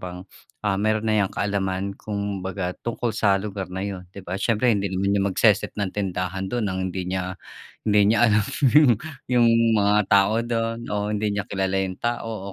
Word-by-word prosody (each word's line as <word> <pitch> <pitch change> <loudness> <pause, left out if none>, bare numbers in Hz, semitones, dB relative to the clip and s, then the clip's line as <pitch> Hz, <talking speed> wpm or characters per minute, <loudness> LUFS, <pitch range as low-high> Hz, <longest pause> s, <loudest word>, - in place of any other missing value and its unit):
bang, 90 0 -7 0.4
ah, 100 -1 +1
meron 110 +1 +1
na 110 -1 +2
yang 95 - +1
kaalaman, 100 -1 -2
kumbaga, 100 -3 -4
tungkol 120 0 -2
sa 100 -3 +2
lugar 100 -1 -5
na 95 +1 -4
iyon, 95 -3 -6
’di 95 0 -11
ba? 95 +3 -4
Siyempre, 115 +3 +2
hindi 100 -1 0
rin 95 - -4
naman 100 +1 0
niyan 100 -1 +2
magse-set 95 - +2
ng 100 -3 -2
tindahan 95 -1 -3
doon 120 +2 -1
nang 95 -2 -2
hindi 95 0 -4
niya 90 0 -3 0.5
hindi 105 0 +4
niya - - +2
alam 105 -1 +3 0.3
yung 130 -6 +6 0.3
yung 120 -2 +4 0.3
mga 105 0 +3
tao 100 +2 +4
doon 115 -1 -2
o 105 0 -2
hindi 105 0 -1
niya 100 - -1
kilala 95 -1 -1
yung 95 -1 -6
tao, 115 -4 -3
100 Hz, 190 wpm, -24 LUFS, 95-110 Hz, 0.5 s, yung